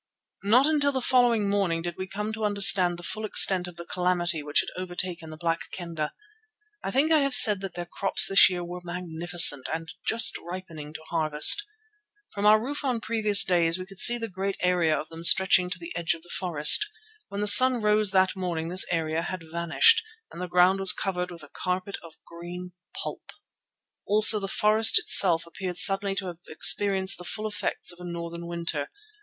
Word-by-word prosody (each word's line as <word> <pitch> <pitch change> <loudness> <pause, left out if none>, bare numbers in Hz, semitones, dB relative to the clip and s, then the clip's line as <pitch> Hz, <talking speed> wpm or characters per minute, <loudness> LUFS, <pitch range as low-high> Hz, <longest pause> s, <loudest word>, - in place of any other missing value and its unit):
Not 230 +7 +2
until 290 -2 0
the 265 - -4
following 240 -4 0
morning 195 -5 -2
did 175 -1 -7
we 185 - -8
come 210 +3 -7
to 220 0 -7
understand 195 -4 +4
the 175 - -13
full 215 +5 -6
extent 190 -3 +2
of 175 - -12
the 170 0 -11
calamity 175 -2 -2
which 145 0 0
had - - -9
overtaken 175 -2 -7
the 155 - -12
Black 165 0 -5
Kendah. 165 -4 -7 0.7
I - - -5
think 280 +9 -1
I 315 - +3
have 275 -2 -1
said 210 -5 +6
that 195 -3 -9
their 175 - -7
crops 195 +3 +1
this 195 0 +5
year 180 -1 -6
were 180 +1 -10
magnificent 175 -4 +2
and 160 +1 -7
just 230 0 +3
ripening 165 -4 -11
to 160 - -10
harvest. 155 - +3 0.7
From 205 +1 -3
our 215 +1 +4
roof 280 +7 -7
on 255 -4 -3
previous 215 -3 +1
days 170 -4 -1
we 185 - -9
could 195 0 -16
see 240 - +6
a 230 -1 -6
great 195 0 -6
area 175 -4 0
of 155 - -10
them 165 0 -12
stretching 185 0 +4
to 180 - -6
the 170 -1 -11
edge 170 -1 -3
of 165 - -17
the 175 - -17
forest. 175 - +3 0.4
When 200 +1 -7
the - - -2
sun 255 +4 +7
rose 210 -1 0
that 190 -1 0
morning 170 -3 -5
this 185 +2 +2
area 160 -1 -3
had 185 0 -8
vanished, 170 - +2 0.3
and 175 - -11
the 180 - -6
ground 180 +2 +1
was 195 -1 +4
covered 180 -2 -5
with 170 -3 -12
a - - -13
carpet 185 +4 -6
of 165 -2 -16
green 175 +2 -11 0.2
pulp. - - -9 0.8
Also 215 +1 +5
the 195 - -6
forest 215 +3 +2
itself 170 -4 +4
appeared 180 +1 -8
suddenly 195 +1 +3
to 195 - -6
have 175 -2 -9
experienced 190 +3 +1
the - - -10
full 215 +6 -6
effects 205 -3 -4
of 175 - -14
a - - -12
northern 170 -1 -8
winter. 170 -4 -6
180 Hz, 200 wpm, -24 LUFS, 170-205 Hz, 0.8 s, sun